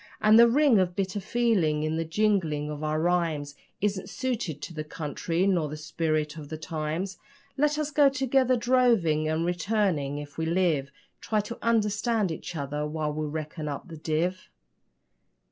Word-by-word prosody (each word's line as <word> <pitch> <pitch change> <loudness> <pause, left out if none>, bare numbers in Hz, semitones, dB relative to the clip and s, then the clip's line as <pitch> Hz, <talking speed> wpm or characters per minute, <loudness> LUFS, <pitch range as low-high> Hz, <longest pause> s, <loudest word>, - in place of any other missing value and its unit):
And 215 +1 +6
the 235 - +9
ring 270 -3 +4
of 180 -1 0
bitter 195 +1 -1
feeling 195 -8 +1
in 155 +1 -1
the 165 - 0
jingling 165 -5 0
of 150 0 -6
our 155 0 0
rhymes 165 -4 0 0.3
Isn't 200 -1 -1
suited 235 - -3
to - - -6
the 155 -1 -4
country 165 +3 -2
nor 175 -6 +1
the 150 - -6
spirit 155 0 -2
of 145 -2 -8
the 155 - -5
times. 160 +4 -4 0.4
Let 300 +1 +2
us 305 -1 -2
go 290 -1 +5
together 265 -1 +2
droving, 230 -11 +3
and 160 +1 0
returning, 175 -5 0
if 145 +1 -8
we 160 - -1
live, 165 -5 +1 0.3
Try 215 - 0
to 220 +3 -8
understand 220 -2 +1
each 160 - -6
other 145 0 -3
while 150 -1 -2
we 155 0 -2
reckon 155 +1 -5
up 145 +5 -5
the 160 - -8
div. 165 +4 -1
170 Hz, 170 wpm, -27 LUFS, 155-215 Hz, 0.4 s, the